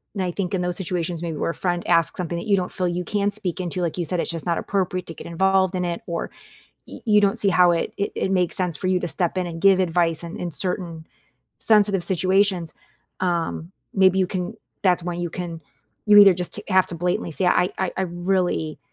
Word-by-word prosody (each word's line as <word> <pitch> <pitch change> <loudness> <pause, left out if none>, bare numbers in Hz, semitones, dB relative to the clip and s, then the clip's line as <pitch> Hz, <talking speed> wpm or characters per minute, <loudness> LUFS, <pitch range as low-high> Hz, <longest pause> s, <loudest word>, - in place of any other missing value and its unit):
and, 195 - -1
I 180 - -1
think 180 0 -3
in 185 - -1
those 180 0 -2
situations, 175 -2 -3
maybe, 165 -3 -4
where 165 - -1
a - - -11
friend 175 -1 -2
asks 165 -2 +2
something 170 -1 -3
that 170 - -6
you 200 -2 +4
don't 180 -1 -2
feel 185 - -1
you 175 +1 -2
can 205 +2 0
speak 195 -5 -3
into, 180 0 -3
like 170 -1 -2
you 175 - -1
said, 180 +1 -1
it's - - -2
just 165 -2 -5
not 170 -1 0
appropriate 185 -2 -2
to 165 - -7
get - - -10
involved 190 +2 +2
in 180 -1 -1
it, 170 -1 -3
or 170 -1 -3 0.6
y - - -9
you 210 -3 +5
don't 200 -1 +2
see 200 - +2
how 180 -2 +5
it 165 - -1
it 200 - -1
it - - -1
makes 180 -3 +1
sense 180 -4 -1
for 185 - -2
you 185 0 +3
to 175 - -3
step 175 +1 -1
in 180 - -1
and 165 -1 -7
give 195 -1 +6
advice 170 -2 +1
in 170 - -7
in 175 - -4
certain 170 -2 -4 0.5
sensitive 205 -4 +3
situations. 190 -1 +1 0.5
Um, 170 -2 -1 0.2
maybe 190 -1 +4
you 190 - +3
can 180 -1 -4 0.3
that's 180 -2 +3
when 175 -1 -3
you 175 -1 -3
can 170 -2 -6 0.5
you 210 -1 +7
either 200 -2 +9
just 180 0 -3
t 210 - -6
have 185 -2 +4
to - - -4
blatantly 175 -1 -1
say, 180 +4 -1
"I 180 0 +3
I 190 -1 -1
I 190 - 0
really 175 -3 -1
180 Hz, 240 wpm, -23 LUFS, 170-190 Hz, 0.6 s, either